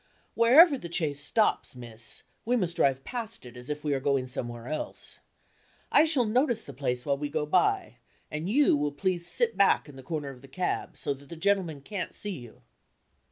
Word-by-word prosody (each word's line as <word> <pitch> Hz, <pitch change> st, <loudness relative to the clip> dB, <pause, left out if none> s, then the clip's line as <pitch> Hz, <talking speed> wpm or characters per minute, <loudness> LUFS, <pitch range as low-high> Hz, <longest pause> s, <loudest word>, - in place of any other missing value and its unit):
"Wherever 275 Hz, +6 st, +7 dB
the 170 Hz, -, -8 dB
chaise 155 Hz, -5 st, 0 dB
stops, 210 Hz, -, +1 dB
miss, 115 Hz, -2 st, -5 dB, 0.2 s
we 245 Hz, +2 st, +1 dB
must 180 Hz, -7 st, 0 dB
drive 135 Hz, -3 st, +2 dB
past 230 Hz, -, -5 dB
it 125 Hz, 0 st, -11 dB
as 125 Hz, +2 st, -10 dB
if 150 Hz, 0 st, -4 dB
we 150 Hz, -, -1 dB
were 140 Hz, -, +1 dB
going 135 Hz, -1 st, +1 dB
somewhere 120 Hz, -2 st, -5 dB
else. 155 Hz, 0 st, -3 dB, 0.7 s
I 305 Hz, -, +6 dB
shall 290 Hz, -7 st, +3 dB
notice 240 Hz, +1 st, +1 dB
the -, -, -10 dB
place 125 Hz, -2 st, -2 dB
while 140 Hz, -2 st, 0 dB
we 145 Hz, 0 st, -3 dB
go 150 Hz, 0 st, -1 dB
by; 400 Hz, -, +1 dB, 0.3 s
and 155 Hz, +4 st, -3 dB
you 280 Hz, -, +4 dB
will 145 Hz, 0 st, 0 dB
please 175 Hz, +2 st, -1 dB
sit 230 Hz, +5 st, +2 dB
back 200 Hz, -4 st, +4 dB
in 145 Hz, -2 st, -12 dB
the -, -, -9 dB
corner 145 Hz, +1 st, -4 dB
of 125 Hz, -2 st, -14 dB
the 135 Hz, -, -13 dB
cab 180 Hz, +7 st, -3 dB
so 145 Hz, -, -2 dB
that 140 Hz, +1 st, -15 dB
the 170 Hz, -, -7 dB
gentleman 170 Hz, -4 st, 0 dB
can't 195 Hz, +5 st, -5 dB
see 205 Hz, -, -2 dB
you." 120 Hz, -, -14 dB
155 Hz, 205 wpm, -28 LUFS, 135-215 Hz, 0.7 s, Wherever